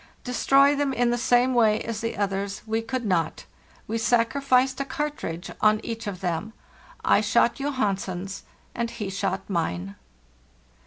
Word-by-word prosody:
Destroy 275 Hz, +3 st, +4 dB
them 280 Hz, -1 st, 0 dB
in 240 Hz, -1 st, +2 dB
the -, -, +2 dB
same 245 Hz, +1 st, +3 dB
way 220 Hz, -3 st, +4 dB
as 225 Hz, -2 st, -4 dB
the 230 Hz, -3 st, -3 dB
others 200 Hz, 0 st, -2 dB
we 220 Hz, 0 st, -1 dB
could 250 Hz, +1 st, -3 dB
not; 170 Hz, -5 st, 0 dB, 0.4 s
we 225 Hz, +1 st, -2 dB
sacri 240 Hz, +4 st, +2 dB
ficed 260 Hz, -1 st, +3 dB
a -, -, +1 dB
cartridge 275 Hz, -, -4 dB
on 215 Hz, 0 st, +4 dB
each 230 Hz, -1 st, -5 dB
of 190 Hz, -2 st, -5 dB
them. 180 Hz, +4 st, -2 dB, 0.5 s
I -, -, +5 dB
shot -, -, +2 dB
Johansen's, 195 Hz, -8 st, -2 dB, 0.3 s
and 235 Hz, -1 st, -2 dB
he 215 Hz, -5 st, -5 dB
shot 195 Hz, 0 st, -2 dB
mine. 100 Hz, -, -2 dB
225 Hz, 155 wpm, -25 LUFS, 195-255 Hz, 0.5 s, I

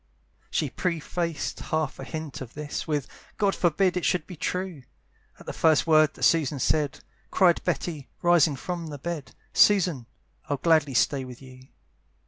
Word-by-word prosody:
She -, -, -1 dB
prefaced 170 Hz, -2 st, -2 dB
half 155 Hz, -3 st, -2 dB
a -, -, -5 dB
hint 155 Hz, 0 st, -6 dB
of 125 Hz, -3 st, -9 dB
this 150 Hz, -1 st, -5 dB
With, 145 Hz, -4 st, -1 dB, 0.3 s
"God 200 Hz, -2 st, +2 dB
forbid 180 Hz, +2 st, +2 dB
it 180 Hz, -, -1 dB
should 175 Hz, -4 st, +1 dB
be 180 Hz, -, -9 dB
true!" 180 Hz, -1 st, -3 dB, 0.6 s
At -, -, -14 dB
the -, -, -5 dB
first 160 Hz, -2 st, +3 dB
word 155 Hz, -2 st, +4 dB
that -, -, -8 dB
Susan 155 Hz, -4 st, +3 dB
said 145 Hz, +1 st, 0 dB, 0.3 s
Cried 175 Hz, -3 st, +3 dB
Betty, 155 Hz, -6 st, -3 dB
rising 170 Hz, -4 st, +4 dB
from 170 Hz, +4 st, -5 dB
the 145 Hz, -2 st, -6 dB
bed, 150 Hz, -3 st, -6 dB, 0.2 s
"Susan, 175 Hz, -, +4 dB, 0.4 s
I'd 145 Hz, -2 st, -2 dB
gladly 155 Hz, -5 st, +3 dB
stay 130 Hz, +3 st, +2 dB
with 125 Hz, -1 st, -10 dB
you. 130 Hz, -1 st, -14 dB
155 Hz, 160 wpm, -26 LUFS, 140-175 Hz, 0.6 s, word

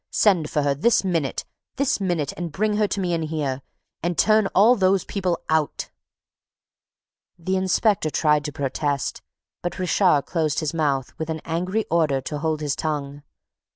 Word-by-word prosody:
"Send 180 Hz, -8 st, +2 dB
for 150 Hz, -, 0 dB
her! 140 Hz, -1 st, +2 dB
This 220 Hz, -, +2 dB
minute! 165 Hz, -8 st, -1 dB, 0.3 s
This 275 Hz, -4 st, +1 dB
minute! 175 Hz, -7 st, -1 dB
And 175 Hz, -2 st, -5 dB
bring 210 Hz, +5 st, 0 dB
her 210 Hz, -, +3 dB
in -, -, -4 dB
to -, -, -2 dB
me 175 Hz, -3 st, -1 dB
here! 145 Hz, -4 st, -2 dB, 0.4 s
And 175 Hz, +1 st, -2 dB
turn 215 Hz, -1 st, +4 dB
all 220 Hz, +6 st, +6 dB
those 190 Hz, -2 st, +2 dB
people 185 Hz, -4 st, -1 dB
out!" 155 Hz, -2 st, -1 dB, 1.5 s
The 185 Hz, +2 st, -2 dB
inspector 190 Hz, -1 st, +2 dB
tried 150 Hz, -1 st, +2 dB
to 150 Hz, -, -3 dB
protest, 140 Hz, 0 st, -2 dB, 0.4 s
but 175 Hz, -, -4 dB
Richard 180 Hz, -5 st, +3 dB
closed 155 Hz, -4 st, 0 dB
his 155 Hz, -2 st, -2 dB
mouth 140 Hz, -5 st, 0 dB
with 160 Hz, 0 st, -3 dB
an 160 Hz, 0 st, -2 dB
angry 180 Hz, +6 st, -1 dB
order 155 Hz, -5 st, +2 dB
to 145 Hz, +3 st, -5 dB
hold 155 Hz, 0 st, -1 dB
his 145 Hz, -2 st, -1 dB
tongue. 145 Hz, -2 st, -3 dB
165 Hz, 165 wpm, -23 LUFS, 150-190 Hz, 1.5 s, all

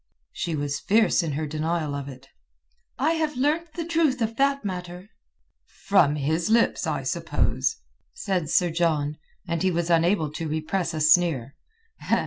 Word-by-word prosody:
She 170 Hz, -2 st, -3 dB
was 145 Hz, -1 st, -2 dB
fierce 220 Hz, -1 st, +3 dB
in 160 Hz, -4 st, -3 dB
her 155 Hz, +2 st, -2 dB
denial 155 Hz, 0 st, -2 dB
of 140 Hz, -1 st, -5 dB
it. 135 Hz, 0 st, -12 dB, 0.7 s
"I 290 Hz, +6 st, +2 dB
have 315 Hz, -4 st, -1 dB
learnt 310 Hz, +5 st, 0 dB
the 335 Hz, -, -3 dB
truth 320 Hz, -6 st, +1 dB
of 225 Hz, -1 st, -1 dB
that 275 Hz, -2 st, +1 dB
matter." 180 Hz, +1 st, -6 dB, 0.7 s
"From 150 Hz, -8 st, +4 dB
his 160 Hz, +6 st, -1 dB
lips, 230 Hz, +1 st, +2 dB
I -, -, -2 dB
suppose?" -, -, -1 dB, 0.4 s
said 185 Hz, -, -2 dB
Sir 175 Hz, +1 st, +2 dB
John, 155 Hz, -3 st, 0 dB, 0.3 s
and 170 Hz, -1 st, -2 dB
he 190 Hz, -, +3 dB
was 170 Hz, -1 st, -1 dB
unable 165 Hz, -1 st, +2 dB
to 160 Hz, +1 st, -4 dB
repress 165 Hz, +3 st, -2 dB
a 155 Hz, -, -2 dB
sneer. 155 Hz, -5 st, +3 dB
170 Hz, 155 wpm, -25 LUFS, 155-220 Hz, 0.7 s, From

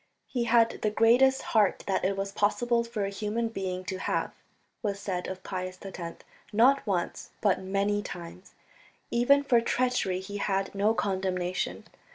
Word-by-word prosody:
"He 245 Hz, -2 st, -2 dB
had 230 Hz, -1 st, +3 dB
the 215 Hz, -, +2 dB
greatest 245 Hz, +5 st, +4 dB
heart 210 Hz, -4 st, +3 dB
that 195 Hz, -, 0 dB
it 195 Hz, +1 st, 0 dB
was 195 Hz, 0 st, -2 dB
possible 235 Hz, +4 st, +1 dB
for 230 Hz, -3 st, -3 dB
a 195 Hz, -, -3 dB
human 215 Hz, +3 st, -2 dB
being 185 Hz, -3 st, -4 dB
to 190 Hz, 0 st, -4 dB
have," -, -, -1 dB, 0.5 s
was 200 Hz, -3 st, -2 dB
said 185 Hz, -3 st, -3 dB
of 190 Hz, 0 st, -6 dB
Pius 185 Hz, -1 st, -4 dB
X, 175 Hz, -3 st, -7 dB, 0.3 s
not 245 Hz, +4 st, +4 dB
once 180 Hz, -4 st, -2 dB
but 200 Hz, -3 st, +2 dB
many 200 Hz, +2 st, 0 dB
times. 180 Hz, -1 st, -9 dB, 0.6 s
Even 280 Hz, +4 st, +4 dB
for 245 Hz, -4 st, +4 dB
treachery 235 Hz, -6 st, 0 dB
he 200 Hz, +2 st, -6 dB
had 195 Hz, -1 st, -1 dB
no 205 Hz, +3 st, +2 dB
condemnation. 185 Hz, -3 st, -1 dB
200 Hz, 160 wpm, -28 LUFS, 190-230 Hz, 0.6 s, greatest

